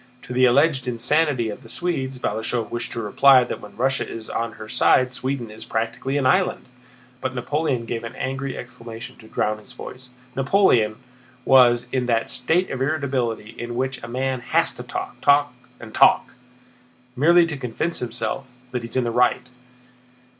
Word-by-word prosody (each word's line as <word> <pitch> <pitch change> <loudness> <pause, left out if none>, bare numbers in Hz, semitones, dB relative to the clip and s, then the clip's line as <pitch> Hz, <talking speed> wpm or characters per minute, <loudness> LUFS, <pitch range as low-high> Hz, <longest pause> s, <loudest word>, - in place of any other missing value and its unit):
To 125 - -7
the 130 +1 +4
alleged 135 +1 +3
insanity 130 0 +1
of 105 - -7
the 115 - -14
Swedes, 135 -7 -2
Balashëv 110 0 -2
wished 120 0 -3
to 115 - -3
reply 130 +5 +6
that 120 - -5
when 105 -1 -12
Russia 135 +3 0
is 110 -1 -7
on 115 -1 -2
her 110 - -10
side 130 +3 +4
Sweden 130 -3 -3
is 110 - -7
practically 115 +5 -2
an 140 - 0
island: 185 +8 +2 0.6
but 130 0 -3
Napoleon 130 -1 -1
gave 115 0 -4
an 115 - -7
angry 135 0 -4
exclamation 120 0 -9
to 110 - -15
drown 105 0 -1
his 115 +4 -16
voice. 125 0 -10 0.3
Napoleon 135 - +3 0.5
was 125 -2 +5
in 125 -2 -1
that 115 -1 0
state 165 +9 +1
of 130 - -4
irritability 130 -7 -1
in 120 0 -5
which 130 +1 -2
a 115 - -7
man 130 +2 -2
has 120 - +1
to - - -8
talk, - - -6
talk, 145 0 +4 0.3
and 110 -2 -11
talk, - - +4 0.8
merely 170 +6 +5
to 160 -2 -4
convince 135 +6 -2
himself 125 +2 -3 0.2
that 125 - -2
he 115 - -7
is - - -4
in 130 - +2
the 120 - -1
right. 125 +1 +2
125 Hz, 175 wpm, -23 LUFS, 115-135 Hz, 0.8 s, reply